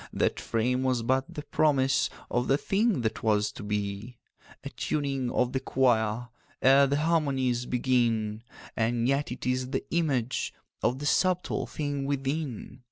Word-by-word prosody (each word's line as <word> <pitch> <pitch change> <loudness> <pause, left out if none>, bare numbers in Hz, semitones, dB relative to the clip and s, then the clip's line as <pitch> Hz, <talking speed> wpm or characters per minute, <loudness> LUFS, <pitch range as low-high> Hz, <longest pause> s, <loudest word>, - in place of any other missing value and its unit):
That - - 0
frame 125 +3 0
was 130 -3 +1
but 130 +3 0
the 150 - -6
promise 140 -3 +2 0.2
of 120 +1 0
The 135 - +3
thing 200 - +1
that 110 -1 -2
was 105 -2 +2
to - - -10
be— 105 +3 -4 0.5
'A - - -5
tuning 135 -4 -2
of 125 +1 0
the 130 - +1
choir 120 -3 +1 0.3
Ere 135 +1 +6
the 140 +1 +1
harmonies 135 -6 +1
begin; 115 -4 +1 0.3
And 115 +1 +1
yet 140 0 0
it 125 - -6
is 125 0 0
the 135 0 -2
image 135 -8 0 0.3
Of 125 - +1
the 145 - -6
subtle 180 +4 +1
thing 145 -2 -3
within. 140 -2 -3
130 Hz, 155 wpm, -28 LUFS, 120-140 Hz, 0.5 s, Ere